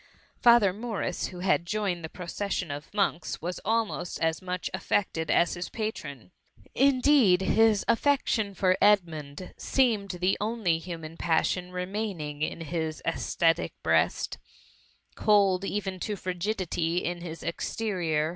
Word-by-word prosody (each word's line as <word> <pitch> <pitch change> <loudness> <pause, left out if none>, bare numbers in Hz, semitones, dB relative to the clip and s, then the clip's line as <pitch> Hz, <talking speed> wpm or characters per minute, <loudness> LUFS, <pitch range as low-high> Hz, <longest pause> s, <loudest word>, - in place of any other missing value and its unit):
^ - - -41
Father 235 -6 +6
Morris, 210 -4 -3
who 180 -1 -9
had 185 -2 +2
joined 195 -4 -1
the 160 - -5
proces 190 +3 -4
sion 170 -5 -3
of 145 +1 -7
monks, 195 -5 -1
was* 175 +2 -4
almost 220 -4 -1
as 165 +1 0
much 180 -1 -3
affected 190 -3 -1
as 170 - +3
his 175 0 -5
patron.. 180 - -5 0.4
Indeed 255 -7 +4
his 220 +1 +3
affection 230 -5 +1
for 185 -1 +3
Edmund 170 -5 +1
seemed 225 -7 +1
the 180 +2 0
only 210 -7 0
human 165 -2 -7
passion 180 +2 0
remaining 180 -5 -4
in 155 - -1
VIS 165 - -7
run 170 - +1
MUMMY. 160 - 0
his 155 -1 -6
ascetic 165 0 +1
breast. 80 +1 +1 0.7
Cold 200 -3 +3
even 195 -2 -3
to 210 +3 -3
frigidity 180 -2 -2
in 175 0 -3
hi 165 -2 -6
exterior. 170 -4 -1
180 Hz, 145 wpm, -28 LUFS, 165-210 Hz, 0.7 s, Father